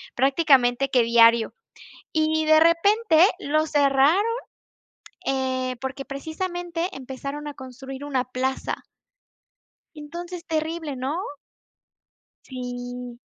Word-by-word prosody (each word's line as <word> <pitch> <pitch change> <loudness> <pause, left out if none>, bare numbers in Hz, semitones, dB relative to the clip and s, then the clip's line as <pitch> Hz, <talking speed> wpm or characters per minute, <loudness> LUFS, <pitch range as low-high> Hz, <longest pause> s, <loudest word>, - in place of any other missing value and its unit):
prácticamente 270 -2 +3
que 250 -3 +4
diario 230 0 +5 0.6
y 315 0 +1
de 310 0 +6
repente, 335 +1 +4
lo 310 -1 +1
cerraron, 285 +4 +4 1.0
eh, 260 -1 -1
porque, 265 +1 -4
precisamente, 345 +4 -4
empezaron 275 +3 -6
a 290 - -5
construir 265 +1 -9
una 265 -3 0
plaza. 255 +1 -3 1.1
Entonces 340 +3 -8
terrible, 315 -2 -3
¿no? 270 +7 -2 1.2
Sí. 245 -1 -7
275 Hz, 90 wpm, -24 LUFS, 255-320 Hz, 1.2 s, de